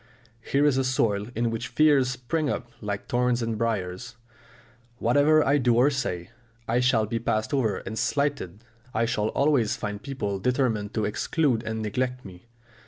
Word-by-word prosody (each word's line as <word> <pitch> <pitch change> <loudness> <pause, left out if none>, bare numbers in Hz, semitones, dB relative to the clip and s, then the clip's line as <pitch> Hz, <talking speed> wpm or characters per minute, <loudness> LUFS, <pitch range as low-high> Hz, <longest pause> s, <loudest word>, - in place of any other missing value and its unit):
Here 140 +5 +1
is 140 -3 +3
a - - +2
soil 110 -5 0
in 115 0 0
which 115 - -3
fears 140 0 +3
spring 130 +5 -2
up 120 -2 -4
like 105 -1 -4
thorns 125 -1 +1
and 115 -1 -2
briars. 110 0 -3 0.8
"Whatever 145 +6 +4
I 145 +1 +3
do 120 -2 +3
or 130 +5 +4
say, 90 -10 -3 0.4
I 115 +2 +2
shall 125 -3 +3
be 115 +2 -2
passed 110 +1 -1
over 120 -7 +1
and 110 - -5
slighted, 120 - -1 0.3
I 115 - +2
shall 110 -2 0
always 135 -3 +2
find 105 -1 -5
people 105 -8 -3
determined 115 -3 0
to 110 -2 0
exclude 125 +3 0
and 110 -1 -4
neglect 125 +4 -2
me!" 90 +2 -12
120 Hz, 170 wpm, -26 LUFS, 110-135 Hz, 0.8 s, Whatever